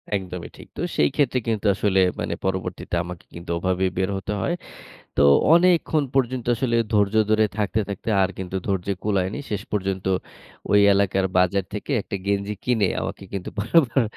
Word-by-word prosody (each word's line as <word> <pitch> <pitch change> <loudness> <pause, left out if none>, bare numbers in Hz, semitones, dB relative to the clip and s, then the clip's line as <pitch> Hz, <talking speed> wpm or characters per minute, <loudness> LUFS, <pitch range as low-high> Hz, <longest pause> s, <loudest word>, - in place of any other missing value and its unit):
একদমই 90 -2 -5
ঠিক। - - -12
তো - - -3 0.2
সেই 75 - +4
ক্ষেত্রে 130 -3 +2
কিন্তু 110 -2 -1
আসলে 95 -1 +1 0.2
মানে - - -2
পরবর্তীতে 90 -2 -3
আমাকে 90 0 -9
কিন্তু 85 0 -10
ওভাবেই 95 +1 0
বের 95 +1 +1
হতে 100 +2 -4
হয়। 175 - 0 0.6
তো - - +3 0.3
অনেকক্ষণ 170 -3 +4
পর্যন্ত 130 -2 0
আসলে 120 -1 0 0.2
ধৈর্য 105 0 +2 0.2
ধরে 110 0 +4
থাকতে, 105 +1 0
থাকতে 100 +3 -4
আর 95 - +2
কিন্তু 95 0 -5
ধৈর্য 95 -1 -1 0.2
কূলায়নি। 100 0 0
শেষ 105 -2 -2
পর্যন্ত 95 -2 -2 0.7
ওই 105 - +6
এলাকার 95 -1 +2
বাজার 90 +1 +2
থেকে 105 +7 -5
একটা 100 - -6
গেঞ্জি 100 +1 0
কিনে, 110 -6 +2
আমাকে - - -5
কিন্তু 95 -2 -4
পরে 100 - -3
আবার 130 0 +1
100 Hz, 170 wpm, -23 LUFS, 95-110 Hz, 0.7 s, ওই